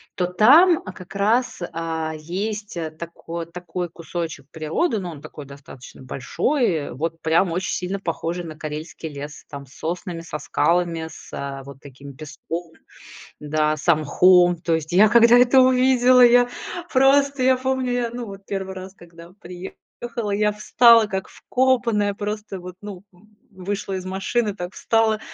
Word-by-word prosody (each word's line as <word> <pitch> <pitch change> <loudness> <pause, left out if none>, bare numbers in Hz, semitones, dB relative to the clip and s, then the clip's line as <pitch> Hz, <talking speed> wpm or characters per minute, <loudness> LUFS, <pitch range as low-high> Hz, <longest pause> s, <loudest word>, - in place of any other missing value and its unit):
То 180 - 0
там, 285 - +5
а, 185 - -7
как 185 +1 -12
раз, 215 +3 0
а, 160 -1 -3
есть, 205 +6 -5
а, 165 -2 -3
тако 170 +1 -7
такой 175 +1 -6
кусочек 165 -4 -6
природы, 165 - -1
ну, 180 -3 -5
он 150 -3 -11
такой 150 -2 -10
достаточно 135 -2 -13
большой, 165 - -1
и - - -7
вот 165 +4 -4
прям 165 +3 +2
очень 180 +3 -2
сильно 190 +2 -3
похожий 170 0 -4
на 155 -1 -9
карельский 155 +1 -6
лес, 145 +1 -9
там, 140 -1 -9
с 130 - -19
соснами, 175 +1 -5
со 155 -2 -6
скалами, 170 +1 0
с 160 - -13
а, 140 -1 -5
вот 140 -1 -11
таким 140 0 -13
песком, 165 +2 -7 0.7
да, 155 +1 0
со 155 - +3
мхом. 175 +3 +4
То 165 0 -1
есть 160 +1 -3
я, 205 +4 +6
когда 235 +2 +6
это 250 +2 +5
увидела, 255 0 +4
я 245 0 +6 0.4
просто 275 +1 +3
я 260 0 +4
помню, 260 -1 -1
я, 245 -1 -1
ну, 240 0 -6
вот 195 -1 -10
1 190 -1 -5
раз, 190 +1 -9
когда 170 -1 -15
приехала, 205 +5 -7
я 210 +1 +1
встала 230 +1 +5
как 190 -1 -4
вкопанная, 235 -5 0
просто 210 -1 -5
вот, 180 0 -9
ну, 200 -3 -8
м 210 +4 -24 0.2
вышла 195 +1 -5
из 185 - -4
машины, 195 +3 -1
так 180 -2 -7
встала 220 -1 +1
180 Hz, 165 wpm, -22 LUFS, 160-220 Hz, 0.7 s, я